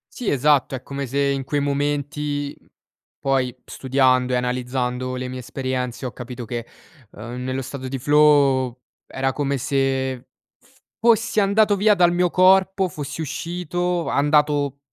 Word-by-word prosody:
Sì, 245 - -2
esatto. 140 -1 +2
È 130 - -5
come 140 0 -5
se 135 +3 -3
in 140 -1 0
quei 145 +2 -1
momenti, 145 0 -2
mhmm, - - -30 0.5
poi 130 -2 0
studiando 130 -1 +1
e - - +2
analizzando 125 0 -2
le 125 0 -4
mie 130 0 -6
esperienze 130 0 -4
ho 125 - -5
capito 125 0 -8
che, 120 0 -5 0.4
uhm, 120 +3 -8
nello 130 +1 -2
stato 130 0 -6
di 135 0 -4
flow 140 -3 +3 0.3
era 135 0 -2
come 140 -1 -1
se 135 -1 0 0.4
f - - -28 0.2
fossi 225 -1 +3
andato 205 +1 +3
via 210 +2 +4
dal 175 -3 +4
mio 175 0 +2
corpo, 190 +1 +4
fossi 150 0 -6
uscito, 175 +2 -2
andato 145 -1 +2
140 Hz, 150 wpm, -22 LUFS, 130-150 Hz, 0.5 s, via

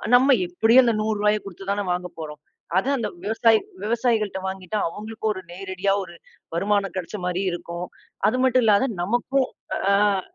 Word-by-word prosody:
நம்ம 265 +2 +6
எப்படியோ 225 +8 +5
அந்த 235 - +3
100 215 0 0
ரூபாய 210 0 +3
குடுத்துத் 195 +1 -6
தான 205 0 0
வாங்கப்போறோம். 160 -4 -5 0.4
அதை 255 +8 +1
அந்த 230 - -1 0.2
விவசாயி 225 +1 +4 0.2
விவசாயிகள்ட்ட 220 -3 0
வாங்கிட்டா 190 +2 -4
அவங்களுக்கு 215 +4 -8
ஒரு 190 - -7
நேரடியா 190 +1 -1
ஒரு 175 - -11 0.4
வருமானம் 200 0 0
கிடைச்ச 185 +3 -4
மாரி 180 +1 -1
இருக்கும். 175 +1 -5 0.4
அது 245 +4 +1
மட்டும் 255 -1 +4
இல்லாத 210 +3 +5 0.2
நமக்கும் 245 +6 +1 0.3
அ - - -4
அஹ 200 -1 +3
205 Hz, 155 wpm, -24 LUFS, 185-225 Hz, 0.4 s, நம்ம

